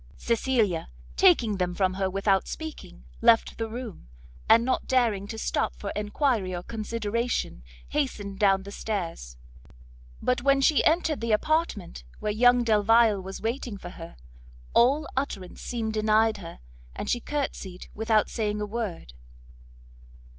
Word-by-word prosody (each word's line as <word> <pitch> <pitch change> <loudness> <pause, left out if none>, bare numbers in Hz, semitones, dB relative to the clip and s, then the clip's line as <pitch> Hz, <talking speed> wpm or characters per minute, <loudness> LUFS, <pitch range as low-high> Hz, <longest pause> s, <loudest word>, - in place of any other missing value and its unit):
Cecilia, 225 -8 0 0.3
taking 255 - +4
them 180 -1 -1
from 185 -1 +1
her 190 0 -1
without 195 0 +1
speaking, 315 - -8 0.2
left 230 0 +4
the 225 0 -2
room, 225 - -8 0.4
and 230 +1 +6
not 260 - -1
daring 230 -6 +1
to 220 - -6
stop - - -1
for 200 - -5
enquiry 210 -2 0
or 175 - -5
consideration, 230 - -2 0.3
hastened 205 -9 -2
down 195 -2 +3
stairs; 170 - -4 0.8
but 250 -1 0
when 275 +1 +3
she 285 +2 +4
entered 320 -3 +2
the 230 -1 -1
apartment 215 - -1 0.2
where 210 - -1
young 245 +3 +4
Delvile 220 -1 +4
was 190 +1 -8
waiting 230 -1 -3
for 175 -2 -9
her, 165 0 -10 0.6
all 275 +6 +4
utterance 200 -9 -4
seemed 225 -2 -3
denied 215 0 +3
her, 170 - -10 0.3
and - - -5
she 240 - +1
courtsied 230 -10 -4
without 220 0 +2
saying 210 -2 -2
a 210 - -2
word. 205 - -5
220 Hz, 140 wpm, -27 LUFS, 195-245 Hz, 0.8 s, and